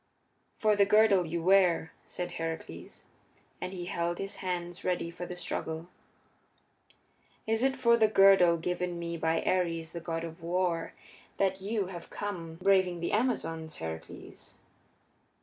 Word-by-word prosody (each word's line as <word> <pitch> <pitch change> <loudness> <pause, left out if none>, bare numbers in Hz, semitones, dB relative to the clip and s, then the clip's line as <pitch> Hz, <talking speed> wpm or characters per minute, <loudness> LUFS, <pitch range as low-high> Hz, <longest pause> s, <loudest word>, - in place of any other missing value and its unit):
"For 215 -1 +2
the 200 -1 +4
girdle 200 -4 +5
you 165 +1 -3
wear," 180 -3 +4
said 180 - -5
Heracles, 165 - -6 0.6
and 185 - -3
he 180 -2 -6
held 170 0 -2
his 195 0 -5
hands 175 -1 -4
ready 175 -2 -1
for 175 +1 -7
the 180 - -6
struggle. 165 -1 -4 1.6
"Is 225 +1 0
it 265 +1 +2
for 235 -2 +4
the 220 -2 +5
girdle 195 -4 +6
given 180 +1 -2
me 170 0 -4
by 160 0 0
Ares, 165 -3 0
the 170 - -5
god 165 0 -3
of 165 0 -8
war, 170 0 -1 0.4
that 190 -1 +1
you 205 0 -1
have 180 -2 -8
come, 175 -6 -5
braving 185 -1 +2
the 170 - -2
Amazons, 165 -9 -1
Heracles?" 80 0 -8
175 Hz, 145 wpm, -30 LUFS, 165-195 Hz, 1.6 s, girdle